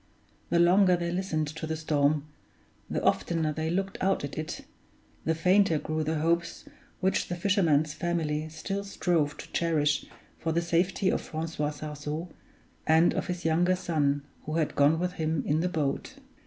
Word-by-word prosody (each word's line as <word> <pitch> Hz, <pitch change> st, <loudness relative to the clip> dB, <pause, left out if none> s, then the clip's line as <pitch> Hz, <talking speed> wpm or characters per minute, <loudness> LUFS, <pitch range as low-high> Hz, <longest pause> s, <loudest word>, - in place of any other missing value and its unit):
The 170 Hz, -, +2 dB
longer 180 Hz, +1 st, +5 dB
they 170 Hz, 0 st, -2 dB
listened 175 Hz, -4 st, -1 dB
to 160 Hz, +1 st, -6 dB
the 160 Hz, -, -2 dB
storm, 150 Hz, -1 st, +1 dB, 0.6 s
the -, -, -2 dB
oftener 160 Hz, -3 st, +1 dB
they 160 Hz, +1 st, -2 dB
looked 195 Hz, +3 st, -2 dB
out 190 Hz, -3 st, +1 dB
at 145 Hz, -, -5 dB
it, 155 Hz, -, -4 dB, 0.6 s
the 160 Hz, -, +2 dB
fainter 180 Hz, +1 st, +4 dB
grew 155 Hz, +1 st, -2 dB
the 160 Hz, +1 st, -1 dB
hopes 170 Hz, +1 st, 0 dB, 0.4 s
which 190 Hz, 0 st, +1 dB
the 175 Hz, -, -3 dB
fisherman's 170 Hz, -6 st, +2 dB
family 160 Hz, -3 st, -1 dB
still 195 Hz, +5 st, -4 dB
strove 165 Hz, -6 st, 0 dB
to -, -, -10 dB
cherish 150 Hz, -4 st, +1 dB, 0.3 s
for 160 Hz, -, -1 dB
the 170 Hz, -, +2 dB
safety 175 Hz, +3 st, +1 dB
of -, -, 0 dB
Francois 160 Hz, -2 st, -3 dB
Sarzeau 150 Hz, +2 st, -5 dB, 0.6 s
and 160 Hz, +2 st, +5 dB
of -, -, -2 dB
his 180 Hz, -1 st, -4 dB
younger 175 Hz, +3 st, +3 dB
son 145 Hz, -6 st, 0 dB, 0.2 s
who 155 Hz, -, -3 dB
had 160 Hz, -2 st, 0 dB
gone 145 Hz, +3 st, +4 dB
with 180 Hz, +2 st, -1 dB
him 155 Hz, -2 st, 0 dB
in 150 Hz, +2 st, +1 dB
the 180 Hz, +2 st, +1 dB
boat. 145 Hz, -5 st, -2 dB
160 Hz, 170 wpm, -28 LUFS, 155-175 Hz, 0.6 s, longer